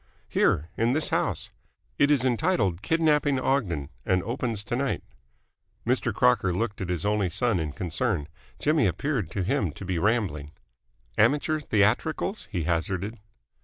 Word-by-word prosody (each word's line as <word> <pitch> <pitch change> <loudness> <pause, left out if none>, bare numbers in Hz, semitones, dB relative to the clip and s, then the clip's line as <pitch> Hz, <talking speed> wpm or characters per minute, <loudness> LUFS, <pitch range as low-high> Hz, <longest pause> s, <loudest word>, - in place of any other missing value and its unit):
"Here. 80 +3 +1
In 115 +2 +2
this 155 +1 +2
house. - - -1 0.5
It 145 - +5
is 140 -4 +3
entitled 120 - +1
'Kidnapping 150 -1 +2
Ogden' 95 - 0
and 90 -1 +1
opens 115 -2 -2
to 120 - -3
night." 135 +2 -1 0.8
Mr. - - +1
Crocker 75 +9 +3
looked 105 0 -2
at 95 - -3
his 90 -1 -2
only 105 -2 +1
son 105 +2 +1
in 80 -2 -2
concern. 90 - -2 0.3
Jimmy 150 -6 +2
appeared 115 - -1
to 95 +2 -2
him 110 - 0
to 95 - -8
be 90 -2 -1
rambling. 95 -9 0 0.7
"Amateur 155 +2 +3
theatricals?" 135 - 0
he 90 -6 -1
hazarded. 95 +6 -2
105 Hz, 145 wpm, -26 LUFS, 90-135 Hz, 0.8 s, It